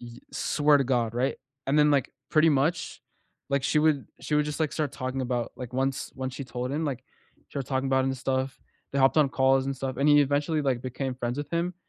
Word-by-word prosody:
Y 120 -1 -10 0.2
swear 145 -1 +3
to 135 - +1
God, 120 -3 +1
right? 130 +3 0 0.3
And 145 +3 +2
then 150 0 +5
like, 140 -3 +2 0.2
pretty 155 +1 +5
much, 150 +4 0 0.5
like, 140 -1 +1
she 150 - +2
would 150 -3 +2
she 150 - -2
would 150 0 +3
just 150 0 -4
like 155 -2 +1
start 150 -3 -2
talking 130 +1 -3
about 120 -2 -2
like 125 -1 -7
once 135 +1 -1
once 130 -1 -4
she 140 - -5
told 125 0 -4
him, 155 +3 -1
like 130 -3 -4 0.5
started 140 -3 -4
talking 130 0 0
about 135 0 +3
it - - +1
and 135 - -2
stuff, 130 +1 -2 0.4
they - - +1
hopped 135 +3 +4
on 150 -3 +5
calls 135 0 +3
and 135 0 -2
stuff, 130 0 -4
and 140 +2 +3
he 145 0 +7
eventually, 145 +3 0
like, 130 -4 0
became 130 +1 -4
friends 120 -1 -3
with 145 0 -5
him, 170 +2 0
135 Hz, 235 wpm, -27 LUFS, 130-145 Hz, 0.5 s, he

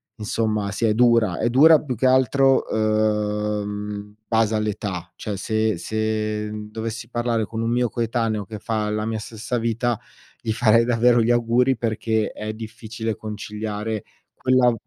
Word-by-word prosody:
insomma, 110 -1 -1
sì, 115 +3 -1
è 105 - +3
dura! 115 -2 +4
È 120 - +1
dura 150 +5 +7
più 130 -4 -3
che 130 +4 +2
altro, 130 +1 +4
uhm, 105 -1 0
in 105 0 -15
base 110 0 +2
all'età, 100 -4 -3
cioè 105 -2 -5
se 110 -1 0
se 110 +2 -2 0.2
dovessi 110 +1 -5
parlare 120 -2 0
con 110 +2 -5
un 115 - 0
mio 120 0 +1
coetaneo 115 -3 -1
che 110 +3 -7
fa 110 -1 -2
la 105 0 -1
mia 110 -1 -2
stessa 115 +3 -4
vita, 115 0 0 0.4
gli 110 - -2
farei 115 0 +4
davvero 120 0 +4
gli 115 - +1
auguri, 120 +2 +2
perché 110 -1 -1
è 110 0 -5
difficile 110 0 -5
conciliare 105 0 -4 0.3
quella 130 -1 +3
110 Hz, 155 wpm, -23 LUFS, 105-120 Hz, 0.4 s, dura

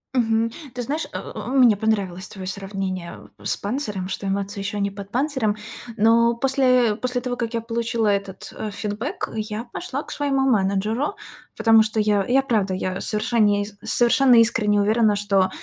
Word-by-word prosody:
Мгм, 225 -1 +2 0.2
ты 245 - -3
знаешь, 295 +7 -3
э, - - -4
э, - - -8
э, - - -6
мне 250 -5 +5
понравилось 195 -4 -1
твое 190 -2 -8
сравнение, 190 -2 -5
э, - - -15
с - - 0
панцирем, 205 -4 -3
что 195 +1 -4
эмоция 200 +1 -2
еще 200 +1 -3
не 200 0 0
под 200 0 -9
панцирем. 255 -5 0 0.4
Но 230 +2 +4
после 255 -3 +3
после 250 +2 -2
того, 245 0 -3
как 235 -1 -3
я 230 - -1
получила 230 0 -1
этот, 200 -2 -2
э, 215 - -4
фидбек, 215 - -4
я 215 0 -3
пошла 275 +3 -5
к - - -11
своему 280 -2 0
менеджеру, 220 - +1 0.4
потому 225 0 +6
что 215 0 -2
я, 210 -2 +2
я, 265 +2 +4
правда, 210 -7 0
я, 185 0 -3
совершенне 210 -2 +1 0.2
совершенно 245 +1 +4
искренне 220 -3 +3
уверена, 215 0 +3
что 195 -2 +2
220 Hz, 175 wpm, -23 LUFS, 200-245 Hz, 0.4 s, потому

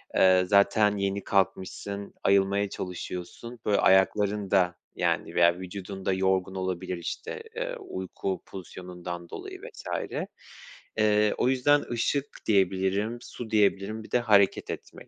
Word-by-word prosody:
eee, 95 -1 +6
zaten 100 +1 +4
yeni 100 0 -1
kalkmışsın 100 +1 -1
ayılmaya 100 +1 +3
çalışıyorsun. 90 +7 -6
Böyle, 105 -1 +3
ayakların 100 +1 +3
da, 90 -3 +3 0.2
yani, - - -1
veya 85 0 +5
vücudun 95 +1 -7
da 95 - +2
yorgun 95 0 +1
olabilir, 95 -1 -3
işte, 85 - -5
eee, - - -3
uyku 95 - -4
pozisyonundan 90 -2 -8
dolayı - - -8
vs. - - -10 1.1
Eee, 105 -1 +3
o 125 - +2
yüzden 145 +3 +3
ışık 130 +4 0 0.2
diyebilirim, 100 +2 +1
su 120 -2 -8
diyebilirim, 105 +1 +1
bir - - -14
de 125 - +3
hareket 105 -4 +3
etmek - - -8
100 Hz, 125 wpm, -27 LUFS, 95-105 Hz, 1.1 s, eee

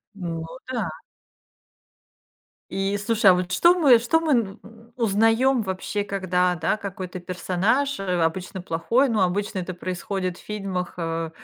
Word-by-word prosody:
Ну 165 -4 -5 0.2
да. 240 - -1 1.8
И, 195 +1 -1
слушай, 205 -1 +3
а - - +8
вот 180 0 -2
что 345 - +5
мы, 265 -8 +6
что 240 +8 +2
мы 320 -2 -1
н 215 -6 0 0.4
узнаём 225 +3 +3
вообще, 195 +1 -3
когда, 180 -2 0
да, 165 +6 0
какой-то 190 -3 -6
персонаж, 190 +10 0
э, - - -3 0.2
обычно 180 +3 -2
плохой, 185 +11 +1
ну, 220 - +1
обычно 195 +2 0
это 185 +1 -4
происходит 185 +1 -3
в - - -14
фильмах, 195 -4 -4
э, 165 -1 -2
195 Hz, 140 wpm, -24 LUFS, 180-225 Hz, 1.8 s, а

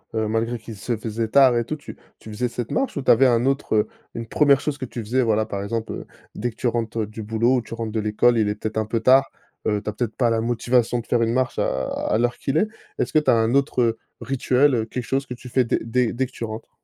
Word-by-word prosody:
Heu, 110 -1 0
malgré 115 +2 -1
qu'il 110 0 -9
se 110 +3 -3
faisait 110 +1 -3
tard 130 -1 +6
et 120 - +1
tout, 155 - -3
tu 145 - -10 0.2
tu - - -12
faisais 120 +3 -1
cette 120 -1 -5
marche 270 - -1
ou - - -1
tu - - +5
avais 130 +3 +6
un 120 0 +2
autre 135 -4 0
heu, 105 - +3 0.3
une 115 0 -5
1re 140 +1 +4
chose 145 -1 -3
que 130 - -3
tu 120 - -8
faisais, 120 +5 0
voilà, 110 -2 +2
par 100 -2 -4
exemple, 115 +2 -3
heu, - - -7 0.3
dès 120 +3 -2
que 115 - -13
tu - - -1
rentres 115 -1 -1
du 110 +1 -8
boulot? 115 +4 +2
Ou - - 0
tu 115 - -10
rentres 115 -1 -4
de 110 - 0
l'école, 110 +3 +3
il 105 -2 +2
est 105 - -1
peut-être 110 +1 -5
un 110 - +1
peu 115 +1 0
tard, 130 +3 +5 0.4
heu, 105 -1 +1
tu 105 - -4
as - - -4
peut-être 110 0 -3
pas 120 -3 +3
la 115 0 +1
motivation 120 +1 +1
de 115 - -8
faire 120 -1 +2
une 115 0 +1
marche 130 -1 0
à 65 0 0
à 110 - -1
l'heure 120 +1 0
qu'il 140 +3 -1
est. 215 - +3 0.3
Est - - +1
ce - - -14
que 155 - +6
tu 150 - -1
as - - +5
un 115 +1 +2
autre, 140 -2 +2
heu, 115 -1 +2 0.2
rituel, 135 +1 +2
heu, 110 -2 0
quelque 125 +2 -5
chose 135 +2 -1
que 125 - -6
tu 125 - -12
fais 130 +1 +2
dès 115 - 0
dès 120 +1 +1
dès 130 +2 -1
que - - -12
tu - - -7
rentres? 110 0 -6
115 Hz, 295 wpm, -23 LUFS, 110-125 Hz, 0.4 s, tard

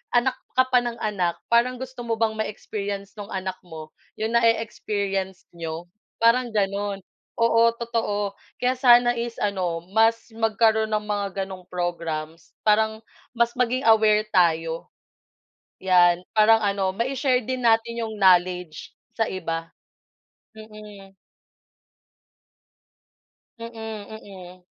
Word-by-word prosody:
anak 255 +2 +3 0.2
ka 255 - +5
pa 250 - +6
ng 240 -1 -4
anak. 185 -5 0 0.2
Parang 240 +2 +3
gusto 260 0 -9
mo 230 - 0
bang 225 0 +1
ma-experience 205 -2 -4
nung 205 - -6
anak 190 -2 -4
mo 160 -3 -11 0.2
'yong 220 +1 -2
na-e-experience 205 -5 0
n'yo? 165 0 -6 0.3
Parang 235 +2 +3
gano'n, 200 -1 -1 0.4
oo, 230 0 +3 0.2
totoo. 210 -4 -2 0.2
Kaya 250 +1 +1
sana 245 -2 +5
is 235 0 -4
ano, 180 -5 -2
mas 225 +1 +2
magkaroon 220 0 +2
ng 215 -1 -1
mga 205 -1 -1 0.2
ganong 185 -2 -10
programs. 165 -2 -4 0.2
Parang 220 +1 +3 0.4
mas 235 0 +2
maging 250 +1 0
aware 215 -1 +4
tayo. 165 -2 +1 0.9
Yan, 180 -2 +4
parang 220 +1 +5
ano 200 -2 0
mai-share 255 +3 0
din 255 +1 -4
natin 230 0 +2
yung 220 - -6
knowledge 180 -3 +2 0.2
sa 225 - +2
iba. 165 -4 -4 0.8
Mm. 210 -3 -13 2.4
Mm, 230 0 -7
mm. 205 -5 -9
215 Hz, 115 wpm, -24 LUFS, 185-230 Hz, 2.4 s, pa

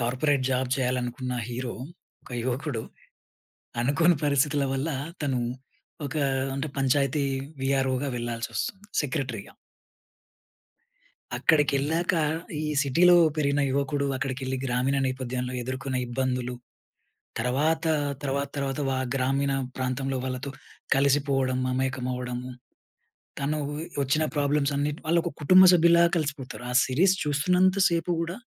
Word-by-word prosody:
Corporate 130 +3 +1
job 130 0 0
చేయాలనుకున్న 125 0 -2 0.2
hero, 120 0 -4 0.5
ఒక - - -16
యువకుడు, 130 -2 -2 1.0
అనుకోని 165 +7 +3
పరిస్థితుల 145 0 +2
వల్ల 135 +4 -1 0.3
తను 135 -3 0 0.7
ఒక 145 +3 -4 0.4
అంటే 140 +2 -2
పంచాయతీ 140 +1 +2 0.4
వీఆర్‌ఓ‌గా 135 0 +1
వెళ్ళాల్సి 120 0 -3
ఒస్తుంది. 200 +1 -3 0.2
సెక్రట్రిగా. 130 -7 -4 1.8
అక్కడికెళ్ళాక 155 +3 +2 0.5
ఈ - - -3 0.2
సిటీలో 170 +6 +5 0.2
పెరిగిన 145 -1 +1
యువకుడు 140 +1 0
అక్కడికెళ్ళి 130 0 -3
గ్రామీణ 130 +2 +1
నేపథ్యంలో 130 -1 -3
ఎదుర్కొన్న 130 +1 -3
ఇబ్బందులు, 125 0 -2 0.9
తరవాత, 145 +8 +1 0.4
తర్వాత, 140 0 -1
తర్వాత 140 0 -2
వా 130 - 0 0.2
గ్రామీణ 135 +1 +1 0.2
ప్రాంతంలో 130 +1 -2
వాళ్ళతో 130 +2 -4 0.4
కలిసిపోవడం, 135 -2 +2
మమేకం 130 0 -1
అవ్వడము, 125 0 -4 0.9
తనూవి 150 +2 -2 0.2
వచ్చిన 140 +4 +1
ప్రాబ్లమ్స్ 145 0 +1
అన్నిటి 145 +1 -1
వాళ్ళు 170 +1 +3
ఒక 175 - -3
కుటుంబ 185 +5 +8
సభ్యుల్లా 170 0 +6
కలిసిపోతారు. 140 -5 -4
ఆ - - -3
సిరీస్ 180 +9 +3
చూస్తున్నంత 180 +6 +2
సేపు 170 +1 0
గూడా 170 +3 -4
135 Hz, 105 wpm, -26 LUFS, 130-150 Hz, 1.8 s, కుటుంబ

